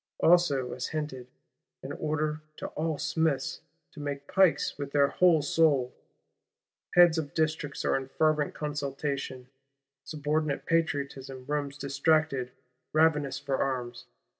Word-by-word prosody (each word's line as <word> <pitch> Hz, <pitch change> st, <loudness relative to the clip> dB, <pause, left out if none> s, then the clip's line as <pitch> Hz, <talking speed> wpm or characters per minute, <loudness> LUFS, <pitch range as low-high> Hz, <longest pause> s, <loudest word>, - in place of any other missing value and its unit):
Also 145 Hz, -8 st, +3 dB
as 125 Hz, -, -4 dB
hinted, 150 Hz, -5 st, -4 dB, 0.6 s
an -, -, -6 dB
order 155 Hz, 0 st, -2 dB, 0.2 s
to -, -, -6 dB
all 155 Hz, -1 st, -2 dB
Smiths 160 Hz, -3 st, -1 dB, 0.3 s
to -, -, -12 dB
make 145 Hz, -1 st, -5 dB
pikes 190 Hz, -3 st, +3 dB
with 140 Hz, -1 st, -5 dB
their 140 Hz, -1 st, +4 dB
whole 170 Hz, -5 st, +4 dB
soul. 145 Hz, -5 st, +2 dB, 1.0 s
Heads 175 Hz, -2 st, +7 dB
of 145 Hz, -3 st, -6 dB
Districts 155 Hz, -2 st, -1 dB
are -, -, +2 dB
in 135 Hz, -1 st, -2 dB
fervent 155 Hz, +1 st, +1 dB
consultation; 140 Hz, -3 st, -4 dB, 0.6 s
subordinate 150 Hz, 0 st, -2 dB
Patriotism 140 Hz, -5 st, -1 dB
roams 145 Hz, 0 st, -2 dB
distracted, 140 Hz, -2 st, +1 dB, 0.4 s
ravenous 150 Hz, -3 st, +3 dB
for 140 Hz, -2 st, -2 dB
arms. 125 Hz, -3 st, -2 dB
145 Hz, 120 wpm, -29 LUFS, 135-155 Hz, 1.0 s, Heads